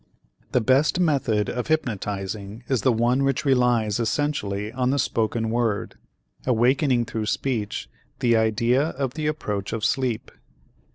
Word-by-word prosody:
The 125 - +2
best 135 +8 +3
method 135 -11 +1
of 125 0 -3
hypnotizing 105 -6 -3
is 130 -5 +1
the 130 - +3
one 120 +4 +2
which 135 +1 0
relies 120 -5 +2
essentially 110 -5 -1
on 125 0 0
the 140 - +1
spoken 115 -3 0
word, 115 -3 0 0.5
awakening 125 +1 +2
through 110 -2 -4
speech 110 -5 -2 0.3
the 120 -1 +2
idea 115 +3 +2
of 135 -4 -2
the 155 -1 -2
approach 105 -10 -3
of 110 -2 -1
sleep. 125 -4 -1
120 Hz, 135 wpm, -24 LUFS, 110-135 Hz, 0.5 s, best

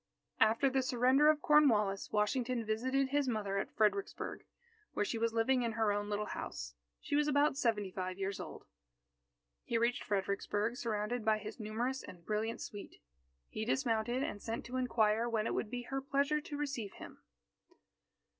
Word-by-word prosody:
After 225 +5 +4
the 265 0 +2
surrender 255 +4 +4
of 305 -1 +2
Cornwallis, 215 -10 +4
Washington 235 +3 0
visited 260 +5 0
his 285 0 +1
mother 205 -4 -1
at - - -3
Fredericksburg, 220 - 0 0.5
where 205 - 0
she 225 - -2
was 230 0 +1
living 230 +3 +2
in 230 -2 -1
her 220 -1 +2
own 205 0 -2
little 210 0 -1
house. - - -5 0.3
She - - -2
was 295 0 +3
about 290 -1 +3
seventy 220 -8 0
five 185 0 -4
years 195 0 -3
old. - - -8 1.0
He 230 - 0
reached 235 +2 +1
Fredericksburg 205 +3 -1
surrounded 230 -1 -2
by 220 0 +3
his 215 +2 -8
numerous 235 +5 -2
and 175 -2 -12
brilliant 220 +2 -2
suite. 205 -1 -8 0.5
He 215 - -4
dismounted, 240 0 0
and 205 -7 -4
sent 230 +1 -4
to 250 +2 -4
inquire 230 -2 +2
when 220 -2 0
it - - -1
would 215 - -2
be 245 +1 -4
her 270 +2 -3
pleasure 280 +2 +1
to 295 -1 -6
receive 270 -9 -3
him. - - -11
230 Hz, 170 wpm, -34 LUFS, 210-260 Hz, 1.0 s, After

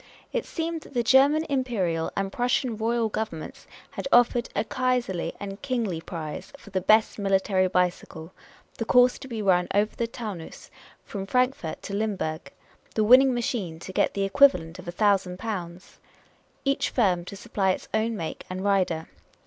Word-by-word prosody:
It - - -2
seemed 330 -1 -3
that 280 - -15
the 240 - +2
Ger 265 +4 +6
man 310 +2 0
Imperial 210 -12 -1
and 195 0 -1
Prussian 245 0 0
Royal 230 +1 0
Governments 210 -7 -5 0.2
had - - -5
offered 240 0 +4
a - - +1
Kaiserly 240 -9 -1
and 200 0 -7
Kingly 230 -11 -2
prize 155 -3 -6
for 205 - -15
the 185 0 0
best 215 +3 +3
military 195 -1 +2
bicycle; 180 -2 -2 0.5
the - - 0
course 250 +2 +4
to 270 - -9
be 225 -4 -4
run 180 -2 +3
over 210 +1 +2
the 235 - -1
Taunus, 215 -8 -8 0.3
from 195 -2 -6
Frankfort 250 - 0
to 200 - -6
Limburg; 190 -9 -2 0.4
the 215 - +2
winning 255 +4 +7
machine 230 -8 -2
to 185 +3 -9
get - - +1
the 200 - 0
equivalent 195 - +3
of 180 - -11
a - - -3
thousand 195 -2 +1
pounds; 185 -4 -6 0.7
each 275 0 +1
firm 185 -8 +2
to 200 - -8
supply 195 0 -1
its 185 - -1
own 220 +1 0
make 165 -3 -5
and 185 +1 -4
rider. 185 -5 +1
205 Hz, 170 wpm, -26 LUFS, 180-240 Hz, 0.7 s, winning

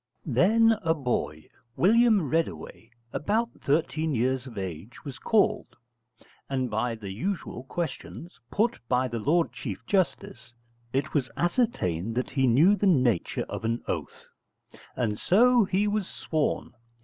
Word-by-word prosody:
Then 225 +2 +4
a 165 -3 +1
boy, 80 - -2 0.3
William 220 -3 +4
Reddaway, 160 -7 -3 0.2
about 225 +8 0
thirteen 155 +1 0
years 130 +2 0
of 115 - -11
age, 95 - -7
was 130 -4 -7
called, 220 -2 +1 0.7
and 130 -3 -1
by 115 +2 -1
the 105 -3 -7
usual 155 - -4
questions, 170 +3 -6
put 230 +3 0
by 125 +1 +2
the 120 -1 -4
Lord 165 +8 +1
Chief 110 -2 -6
Justice, 120 - -2 0.4
it 135 +3 -1
was 135 -5 0
ascertained 115 - 0
that 125 - -2
he 135 -2 +2
knew 155 - +5
the 205 - +1
nature 125 - +2
of - - -6
an 115 +1 -1
oath. - - -5 0.7
And 110 -4 -1
so 240 +3 +4
he 195 +2 +1
was 210 -2 -1
sworn. 155 -2 -2
140 Hz, 135 wpm, -27 LUFS, 120-190 Hz, 0.7 s, knew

